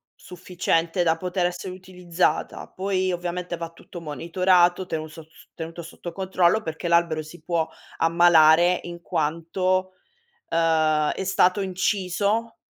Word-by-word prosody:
sufficiente 175 -1 -1
da 165 -1 +2
poter 180 0 -1
essere 180 +1 -4
utilizzata. 180 -1 -2
Poi 190 -1 -1
ovviamente 175 0 -4
va 165 0 -5
tutto 170 +1 -11
monitorato, 175 +3 +2
tenuto 155 -1 -4
sot 155 - -18 0.3
tenuto 165 +1 -7
sotto 170 +1 -9
controllo 190 +2 +1
perché 160 +2 -5
l'albero 170 -2 +2
si 155 +1 -13
può 165 -1 0 0.3
ammalare 170 +1 +5
in 170 0 -8
quanto, 185 +5 -1 0.6
ehm, 155 -2 +2
è - - -4
stato 185 +1 +2
inciso 200 +4 -1
175 Hz, 125 wpm, -24 LUFS, 165-185 Hz, 0.6 s, ammalare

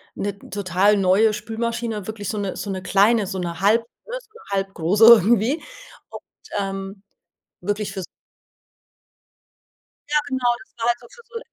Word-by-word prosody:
'ne 200 0 -4
total 200 +1 +2
neue 200 +3 +3
Spülmaschine, 225 -1 -3
wirklich 210 -3 -5
so 215 - -3
'ne 200 -2 -3
so 205 - -5
'ne 190 -1 -3
kleine, 205 +2 +3
so 190 0 -4
'ne 170 -1 -4
halb 215 +4 +4 0.3
ne, - - -4
so 450 - -26 0.3
halbgroße 195 +1 0
irgendwie 235 - +6 0.5
und, - - -10 0.3
ähm 195 0 -4 0.6
wirklich 205 +3 -2
fürs 190 -2 -5 2.1
Ja, 300 - +2
genau, 260 -3 0
das - - -34
war 230 - -1
halt 240 0 +2
so 240 - -15
für 470 - -16
so 470 -2 -7
205 Hz, 150 wpm, -22 LUFS, 195-235 Hz, 2.1 s, irgendwie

